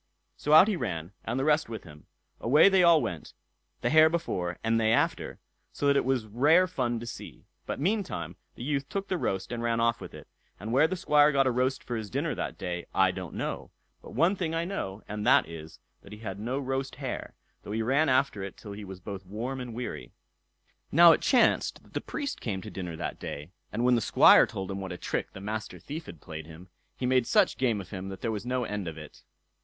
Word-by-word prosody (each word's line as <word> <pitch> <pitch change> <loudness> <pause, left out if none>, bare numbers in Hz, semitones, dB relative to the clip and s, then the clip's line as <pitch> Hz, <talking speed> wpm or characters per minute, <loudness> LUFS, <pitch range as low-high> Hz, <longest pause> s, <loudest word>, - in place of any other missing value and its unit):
So 150 - 0
out 160 +6 +9
he 215 - +1
ran, 90 - -4
and 120 +4 -2
the - - 0
rest 150 -3 +2
with 110 -3 -6
him—away 115 - +1
they 190 -1 +4
all 170 -3 +6
went, 85 -3 -6 0.5
the - - 0
hare 155 0 +7
before, 90 - -2
and 115 0 +2
they 110 0 +3
after; 115 - 0 0.3
so - - -4
that 140 0 +4
it 140 - +2
was 130 -4 0
rare 145 - +4
fun 125 -10 -2
to - - -6
see. 120 - -9 0.2
But - - -3
meantime 145 - -2 0.2
the - - -8
youth 140 0 -2
took 195 0 -4
the 185 - 0
roast 95 -4 -2
and 120 -1 -3
ran 115 0 0
off 115 -1 +1
with - - -9
it; - - -12 0.3
and 105 +4 -5
where 140 +5 +5
the 185 - -3
Squire 150 -4 +4
got 135 -1 +3
a 130 - +3
roast 130 +2 0
for 120 - -4
his 110 -2 -4
dinner - - -1
that - - -4
day 90 -2 -4
I - - +4
don't - - -7
know; - - -4 0.3
but - - -12
one 170 - +3
thing 165 -4 -2
I 165 +1 -1
know, 110 - -5
and 105 0 -4
that 130 - +5
is, 80 -1 -10 0.2
that 100 - -15
he 105 - -8
had 100 -3 -6
no 120 +5 -2
roast 135 -2 -3
hare, - - -5 0.3
though - - -9
he 110 +1 -1
ran 140 +6 +2
after 130 -5 +2
it 95 -1 -7
till 105 - -10
he 105 +1 -7
was 95 -2 -9
both 95 +1 -7
warm 115 +8 -5
and 125 -1 -6
weary. 120 +2 -6 0.8
Now 170 +2 +8
it - - +2
chanced 255 -3 +3
that - - -22
the - - -2
Priest 290 -2 -5
came 95 -5 -3
to - - -8
dinner 90 -3 -5
that - - -5
day, 75 +5 -7 0.2
and 115 +3 -1
when 125 - +5
the 120 - +3
Squire - - +7
told 95 0 -5
him 100 0 -4
what 95 - -5
a 90 - -5
trick - - -3
the 95 - -9
Master 110 +2 -5
Thief 160 +3 -7
had 80 - -11
played 80 0 -8
him, 85 +3 -13 0.3
he 130 - -3
made 125 -1 +2
such - - +3
game 120 -5 +1
of 95 -2 -9
him 95 -1 -5
that 95 - -8
there 115 - -1
was 110 +2 -5
no 125 0 0
end 105 -5 -4
of 80 -1 -6
it. 75 -1 -11
115 Hz, 240 wpm, -28 LUFS, 95-140 Hz, 0.8 s, out